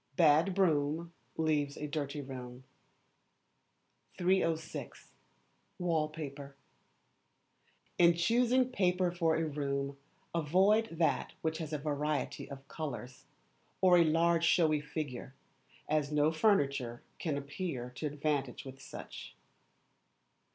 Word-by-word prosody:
[A - - -40
BAD 160 +4 +4
BROOM 165 -2 +1 0.2
LEAVES 150 -3 +1
A 150 - -4
DIRTY 145 -1 -3
ROOM.] 125 -2 -8 1.5
306. 175 -3 -1 0.6
Wallpaper. 155 -5 -2 1.4
In 170 -1 +6
choosing 245 +7 +3
paper 180 -5 +2
for 165 -2 +1
a 165 - 0
room, 140 -2 -2 0.4
avoid 190 +8 +3
that 165 0 0
which 160 0 -1
has 160 -2 -5
a 150 - -1
variety 150 0 -2
of 140 0 -10
colours, 130 -5 -6 0.5
or 180 -2 +6
a - - +7
large 165 +1 +3
showy 155 -3 +4
figure, 145 -4 -5 0.5
as 150 -1 0
no 150 +1 +3
furniture 140 - +1 0.2
can 155 -4 -1
appear 140 -3 -4
to 140 +5 -4
advantage 145 -3 -2
with 135 0 -10
such. - - -9
155 Hz, 110 wpm, -33 LUFS, 140-170 Hz, 1.5 s, a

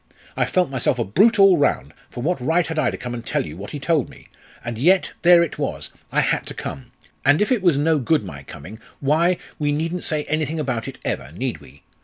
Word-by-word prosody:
I - - +1
felt 180 -6 +1
myself 130 -1 0
a 120 - 0
brute 205 - +3
all 195 -3 +6
round; 145 - 0 0.2
for 120 - -7
what 170 -2 -1
right 165 +6 +2
had 160 -1 -3
I - - +2
to - - -5
come 125 0 -6
and 120 -1 -6
tell - - -1
you 75 - -8
what 100 +4 -8
he - - -6
told 155 -1 0
me? - - -16 0.4
And 115 -1 -4
yet, 180 +7 +3
there 170 0 +7
it 170 - -5
was - - -4 0.2
I - - +3
had - - 0
to - - -6
come. 65 - -7 0.3
And 145 +2 +4
if 210 - +1
it 245 -5 +2
was 175 -6 +3
no 155 +1 +2
good 145 0 +1
my 70 -8 -8
coming, 100 +9 -11 0.2
why, 165 +6 +2 0.2
we 145 -1 +1
needn't 165 +4 -2
say 155 -2 0
anything 155 +1 -2
about 125 -6 -2
it - - -7
ever, 65 - -3
need 115 +4 -4
we? 70 0 -17
150 Hz, 240 wpm, -22 LUFS, 120-170 Hz, 0.4 s, there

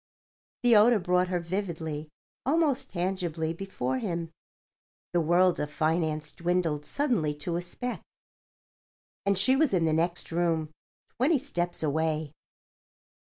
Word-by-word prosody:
The 240 -2 +6
odour 220 +3 +6
brought 180 -1 +2
her 180 -1 0
vividly, 165 -4 -4 0.3
almost 290 -1 +1
tangibly 175 -3 -2
before 130 -9 -3
him. 170 -2 -3 0.8
The 175 - +3
world 175 +3 +3
of 150 0 -2
finance 155 -1 0
dwindled 170 -4 -1
suddenly 230 - 0
to 170 +4 -3
a 175 - -1
speck. 245 +8 -5 1.3
And 200 -1 +3
she 260 +7 +4
was 280 -7 +3
in 170 -2 +2
the 160 - +2
next 170 +2 0
room—twenty 170 - -1
steps 175 - -3
away. 155 0 0
175 Hz, 120 wpm, -28 LUFS, 160-195 Hz, 1.3 s, The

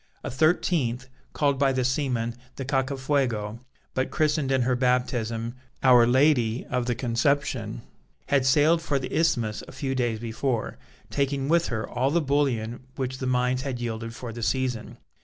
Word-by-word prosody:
A - - -4
thirteenth, 130 -4 +1 0.2
called 140 -2 +1
by 140 -1 +4
the 130 -1 0
seamen 125 -4 0 0.2
the 135 - -5
Cacafuego, 130 -5 0 0.3
but 130 0 0
christened 150 -3 +1
in 130 -2 +3
her 125 +1 +1
baptism 120 -2 0 0.3
"Our 125 -3 +7
Lady 125 -3 +3
of 125 -1 0
the 120 - +1
Conception," 120 - 0 0.4
had 140 -2 +2
sailed 150 +5 +4
for 150 -3 0
the 135 - -4
Isthmus 120 -10 +1
a - - -10
few 130 0 -3
days 120 -3 0
before, 115 +1 -2 0.3
taking 140 0 0
with 170 +1 +3
her 110 -2 -3
all 130 +2 0
the 170 +4 +2
bullion 135 -6 0 0.2
which 130 -1 -3
the 130 - -2
mines 125 0 +1
had 130 -3 -4
yielded 115 -1 -4
for 120 -3 -7
the 120 - -7
season. 125 0 -1
130 Hz, 160 wpm, -26 LUFS, 120-140 Hz, 0.4 s, Our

